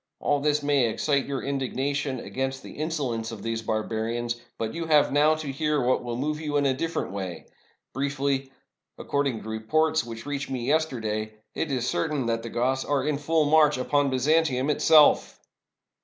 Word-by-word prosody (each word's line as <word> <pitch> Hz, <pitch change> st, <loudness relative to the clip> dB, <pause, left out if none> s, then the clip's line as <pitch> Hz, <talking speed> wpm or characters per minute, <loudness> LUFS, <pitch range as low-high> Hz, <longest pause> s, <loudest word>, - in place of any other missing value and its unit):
All 145 Hz, -, +1 dB
this 150 Hz, 0 st, +1 dB
may 140 Hz, -5 st, +3 dB
excite 140 Hz, +4 st, 0 dB
your 140 Hz, -2 st, -3 dB
indigna 135 Hz, 0 st, -1 dB
tion 140 Hz, -3 st, -2 dB
against 135 Hz, +2 st, -4 dB
the -, -, -9 dB
insolence 140 Hz, -8 st, -3 dB
of 110 Hz, -3 st, -8 dB
these 115 Hz, 0 st, -2 dB
barbarians; 115 Hz, +2 st, -2 dB, 0.2 s
but 110 Hz, 0 st, -3 dB
you 165 Hz, -1 st, -4 dB
have 150 Hz, -2 st, +4 dB
now 150 Hz, +2 st, +4 dB
to 155 Hz, -3 st, -5 dB
hear 150 Hz, +2 st, 0 dB
what 130 Hz, 0 st, +1 dB
will 120 Hz, -1 st, -4 dB
move 150 Hz, +4 st, -2 dB
you 150 Hz, -2 st, -1 dB
in 145 Hz, -, +2 dB
a 135 Hz, -, +3 dB
different 165 Hz, -, -3 dB
way. 95 Hz, -3 st, -5 dB, 0.5 s
Briefly, 135 Hz, 0 st, -1 dB, 0.5 s
according 140 Hz, -5 st, -1 dB
to -, -, -9 dB
reports 155 Hz, +9 st, +1 dB
which 115 Hz, -1 st, -8 dB
reached 145 Hz, -1 st, -3 dB
me 125 Hz, -3 st, -3 dB
yester 155 Hz, -2 st, +1 dB
day, 110 Hz, 0 st, -3 dB, 0.2 s
it 160 Hz, -, -2 dB
is 125 Hz, -2 st, -1 dB
certain 150 Hz, -5 st, -1 dB
that 115 Hz, 0 st, 0 dB
the 115 Hz, -, -6 dB
Goths 130 Hz, +3 st, 0 dB
are 140 Hz, -2 st, 0 dB
in 150 Hz, -2 st, 0 dB
full 155 Hz, +1 st, +2 dB
march 150 Hz, -1 st, +4 dB
upon 145 Hz, +2 st, +1 dB
Byzantium 140 Hz, +1 st, +2 dB
itself!" 155 Hz, 0 st, +5 dB
135 Hz, 185 wpm, -26 LUFS, 120-150 Hz, 0.5 s, itself